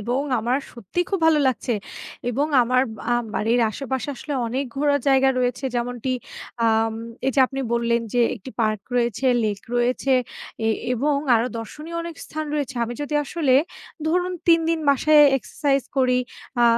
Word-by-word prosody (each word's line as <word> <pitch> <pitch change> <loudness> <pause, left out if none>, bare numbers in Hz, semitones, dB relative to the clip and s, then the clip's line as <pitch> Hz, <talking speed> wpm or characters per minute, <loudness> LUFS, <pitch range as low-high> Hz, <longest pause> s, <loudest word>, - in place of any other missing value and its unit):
এবং 245 +5 -1 0.2
আমার 245 +4 +1
সত্যিই 240 - -3
খুব 390 - +1
ভালো 320 -2 +5
লাগছে। 250 -1 0 0.6
এবং 275 +5 0 0.2
আমার 250 +2 +2 0.3
আ - - +3 0.2
বাড়ির 230 +3 +2
আশেপাশে 265 +2 -4
আসলে 295 - -6
অনেক 260 +4 -2
ঘোরার 285 +1 +2
জায়গা 270 0 +5
রয়েছে। 250 +1 -1
যেমনটি 245 +1 -2 0.6
আম 225 0 +2 0.3
এইযে 270 +1 +2
আপনি 270 +1 -5
বললেন 235 0 +1
যে, 245 - +3 0.2
"একটি 230 +4 -10
পার্ক 215 -2 +1 0.2
রয়েছে, 240 +1 0 0.2
লেক 205 -2 -1
রয়েছে 250 +3 +1 0.5
এ - - +2 0.3
এবং 285 +4 +1 0.2
আরো 230 +1 +2
দর্শনীয় 305 +9 -7
অনেক 335 0 -6
স্থান 310 0 -5
রয়েছে।" 280 -3 -2
আমি 235 +1 -5
যদি 290 +1 -4
আসলে 285 -3 +1 0.5
ধরুন 360 +3 +1 0.2
৩ 330 -1 +6
দিন 330 -1 +1
বাসায় 300 +2 +5
এক্সারসাইজ 275 +1 -1
করি, 255 -1 +3 0.4
আ - - +7
260 Hz, 155 wpm, -23 LUFS, 235-290 Hz, 0.6 s, আ